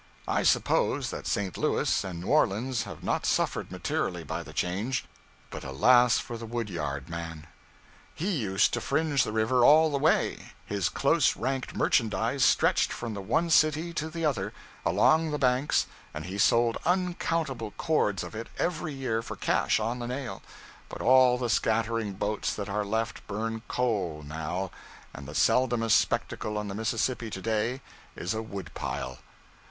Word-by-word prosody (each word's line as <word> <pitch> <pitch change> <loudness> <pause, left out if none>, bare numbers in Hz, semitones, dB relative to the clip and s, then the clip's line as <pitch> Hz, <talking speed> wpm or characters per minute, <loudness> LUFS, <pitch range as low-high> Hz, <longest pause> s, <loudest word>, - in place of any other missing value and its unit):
I - - +1
suppose - - +2
that - - -6
St. 100 -3 -1
Louis - - +1
and 90 -3 -6
New - - -7
Orleans 125 -3 +2
have 95 -6 -9
not - - 0
suffered - - 0
materially - - -2
by - - -4
the - - -10
change, 105 +8 -1 0.5
but - - -7
alas 120 - +4
for 120 -1 -5
the 115 - -7
wood 115 -2 -3
yard 70 -4 -4
man! 85 -2 -6 0.7
He 185 +6 -1
used 105 - +1
to - - -1
fringe 150 -5 +1
the - - -3
river 110 +3 +2
all 155 +4 +6
the 140 - 0
way; 155 +3 +1
his 100 -4 -1
close - - +2
ranked 135 -1 -3
merchandise 115 +3 +1
stretched - - +3
from 115 -2 -4
the 100 - -5
one 160 - 0
city 155 +2 +3
to 155 0 -3
the 165 0 -3
other, 105 -9 -1 0.3
along 160 0 +3
the 150 - -1
banks, 130 +1 +2 0.3
and 75 +1 -5
he 95 +2 -5
sold 115 +2 +3
uncountable 165 - -1
cords 105 - +1
of 85 - -8
it 115 +1 -6
every 160 -3 -2
year 125 -4 -1
for - - -7
cash - - +1
on 115 +3 -2
the 120 - -4
nail; 130 0 -5 0.5
but - - -6
all 130 -1 +6
the 125 -1 -2
scattering 115 -2 0
boats 105 +2 -2
that 100 -1 -5
are 105 +1 0
left 110 +2 -3
burn 115 +2 -3
coal 100 -11 -1
now, 80 +5 -3 0.4
and 70 0 -9
the 75 - -8
seldomest 120 -4 +3
spectacle 105 -1 -2
on 105 -1 -3
the - - -4
Mississippi 115 +2 -1
to 95 - -6
day 115 +4 -1 0.3
is 90 - -3
a 110 - -2
wood 100 -6 -7
pile. 65 0 -4
115 Hz, 170 wpm, -28 LUFS, 100-130 Hz, 0.7 s, all